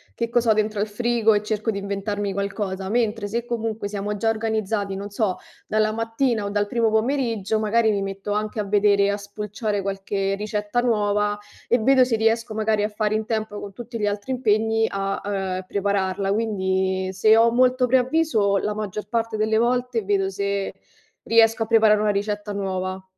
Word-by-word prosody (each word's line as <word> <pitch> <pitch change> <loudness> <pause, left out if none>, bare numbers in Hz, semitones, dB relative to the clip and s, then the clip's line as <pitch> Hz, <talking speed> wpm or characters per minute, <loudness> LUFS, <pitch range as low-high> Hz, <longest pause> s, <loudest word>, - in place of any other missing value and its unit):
che 235 -1 -2
cos'ho 235 -1 +3
dentro 215 -1 -1
al 205 - +2
frigo 230 +1 +2
e 205 - +2
cerco 215 +1 -1
di 200 - -4
inventarmi 200 0 -3
qualcosa, 195 -1 -3
mentre 220 -1 0
se 230 +3 -2
comunque 225 -3 -3
siamo 205 0 -3
già 225 +2 0
organizzati, 220 -2 -1
non 200 +1 -6
so, 205 -2 -1 0.3
dalla 215 0 +1
mattina 225 0 -1
o - - -2
dal 205 0 0
primo 230 +1 +1
pomeriggio, 225 -3 0
magari 220 +1 +2
mi 200 -1 -1
metto 195 +1 -5
anche 210 +1 -2
a - - +1
vedere, 200 0 +3
a 200 - 0
spulciare 210 +1 -4
qualche 195 0 -2
ricetta 210 +3 -2
nuova 210 -3 +1 0.3
e 245 - +3
vedo 260 +3 +5
se 245 -2 0
riesco 225 +1 +1
magari 215 -1 +1
a 210 - 0
fare 215 0 -1
in 215 0 -1
tempo 215 -2 -3
con 200 - -8
tutti 240 +2 -7
gli 210 - -1
altri 205 +5 -2
impegni 225 -2 +2
a, 195 -1 -2
uhm, 190 -2 -2
prepararla. 195 -1 -1
Quindi, 190 -3 0
se 215 +4 +4
ho 230 +1 +5
molto 255 +1 +3
preavviso, 255 -5 +2
la 210 +1 -2
maggior 210 -1 -5
parte 230 -1 -1
delle 215 0 +1
volte 245 0 +1
vedo 195 -1 +1
se 200 0 -2 0.5
riesco 225 0 +4
a - - -4
preparare 220 -2 +4
una 210 -1 +2
ricetta 205 +1 -2
nuova. 190 -1 -3
210 Hz, 180 wpm, -23 LUFS, 200-225 Hz, 0.5 s, vedo